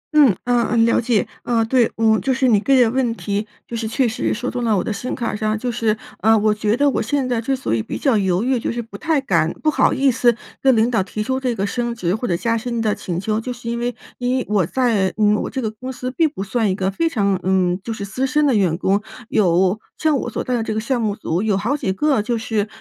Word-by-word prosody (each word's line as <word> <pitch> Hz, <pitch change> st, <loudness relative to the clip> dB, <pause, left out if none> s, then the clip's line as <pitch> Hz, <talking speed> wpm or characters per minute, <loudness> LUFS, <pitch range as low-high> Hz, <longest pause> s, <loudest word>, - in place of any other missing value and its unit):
嗯， 280 Hz, -9 st, +7 dB
呃 245 Hz, -1 st, +2 dB
呃 230 Hz, -, +1 dB
了 230 Hz, +1 st, +4 dB
解。 230 Hz, -3 st, +1 dB, 0.2 s
呃 230 Hz, -2 st, +1 dB
对。 240 Hz, 0 st, +2 dB
嗯 220 Hz, -1 st, +3 dB
就 265 Hz, -, +1 dB
是 260 Hz, 0 st, +2 dB
你 215 Hz, -5 st, +4 dB
个 275 Hz, +6 st, +1 dB
人 245 Hz, -2 st, +4 dB
问 245 Hz, -3 st, 0 dB
题 205 Hz, 0 st, -3 dB, 0.2 s
就 235 Hz, -, -6 dB
是 225 Hz, -1 st, -2 dB
确 250 Hz, +3 st, +1 dB
实 225 Hz, -, -1 dB
说 245 Hz, +3 st, -3 dB
动 245 Hz, -1 st, -3 dB
了 220 Hz, -4 st, +2 dB
我 -, -, 0 dB
的 220 Hz, -, -2 dB
心 245 Hz, +5 st, -4 dB
坎 235 Hz, -4 st, -3 dB
上， 215 Hz, +1 st, -1 dB
就 245 Hz, +2 st, -2 dB
是 220 Hz, -2 st, 0 dB, 0.2 s
呃 220 Hz, +1 st, +5 dB
我 210 Hz, 0 st, +2 dB
觉 215 Hz, +2 st, 0 dB
得 285 Hz, +1 st, +3 dB
我 -, -, -1 dB
现 260 Hz, +4 st, -1 dB
在 240 Hz, -2 st, 0 dB
之 270 Hz, +4 st, 0 dB
所 255 Hz, -, -3 dB
以 115 Hz, -, +1 dB
比 -, -, -5 dB
较 270 Hz, -5 st, +2 dB
犹 190 Hz, 0 st, +1 dB
豫 255 Hz, -1 st, +1 dB
就 -, -, -2 dB
是 235 Hz, 0 st, -3 dB
不 225 Hz, -, -13 dB
太 315 Hz, -2 st, +1 dB
敢 170 Hz, -, +1 dB
不 310 Hz, -, +3 dB
好 -, -, +3 dB
意 275 Hz, -1 st, +3 dB
思 240 Hz, -1 st, +3 dB, 0.3 s
跟 265 Hz, -2 st, +4 dB
领 225 Hz, +2 st, +2 dB
导 225 Hz, -4 st, +2 dB
提 205 Hz, +3 st, -4 dB
出 260 Hz, +3 st, -1 dB
这 250 Hz, -3 st, -1 dB
个 195 Hz, -, -1 dB
升 240 Hz, +2 st, -2 dB
职 180 Hz, -6 st, -1 dB
或 245 Hz, +3 st, -3 dB
者 175 Hz, -2 st, 0 dB
加 230 Hz, +3 st, 0 dB
薪 235 Hz, +1 st, -3 dB
的 220 Hz, -2 st, +1 dB
请 175 Hz, -2 st, -4 dB
求， 215 Hz, +3 st, -1 dB
就 250 Hz, -, -5 dB
是 240 Hz, -1 st, -6 dB
因 235 Hz, 0 st, -2 dB
为 240 Hz, 0 st, -2 dB, 0.2 s
因 250 Hz, +1 st, 0 dB
为 255 Hz, -, -2 dB
我 200 Hz, -5 st, +2 dB
在 225 Hz, -7 st, +1 dB
嗯 210 Hz, -1 st, +4 dB
我 -, -, -2 dB
这 265 Hz, -, -3 dB
个 220 Hz, -, -1 dB
公 255 Hz, +4 st, -7 dB
司 255 Hz, 0 st, -5 dB
并 320 Hz, +4 st, +2 dB
不 240 Hz, -10 st, -6 dB
算 220 Hz, +1 st, 0 dB
一 185 Hz, -, 0 dB
个 190 Hz, 0 st, -1 dB
非 330 Hz, +12 st, 0 dB
常 200 Hz, -, 0 dB
嗯 185 Hz, -1 st, +1 dB
就 230 Hz, -, -5 dB
是 205 Hz, -3 st, -4 dB
资 255 Hz, +7 st, -2 dB
深 300 Hz, +3 st, +2 dB
的 275 Hz, -, +3 dB
员 180 Hz, -5 st, +2 dB
工。 195 Hz, +2 st, +1 dB, 0.3 s
有 185 Hz, 0 st, +2 dB, 0.2 s
像 310 Hz, -2 st, +2 dB
我 -, -, -3 dB
所 -, -, -3 dB
在 255 Hz, -, -2 dB
的 235 Hz, -, 0 dB
这 220 Hz, -, -3 dB
个 -, -, 0 dB
项 240 Hz, +2 st, -1 dB
目 210 Hz, -2 st, 0 dB
组 170 Hz, -2 st, -2 dB
有 210 Hz, -2 st, +1 dB
好 225 Hz, +8 st, 0 dB
几 205 Hz, -10 st, -2 dB
个 275 Hz, -1 st, +1 dB
就 235 Hz, +2 st, -1 dB
是 220 Hz, -2 st, -1 dB
225 Hz, 300 characters per minute, -20 LUFS, 205-250 Hz, 0.3 s, 嗯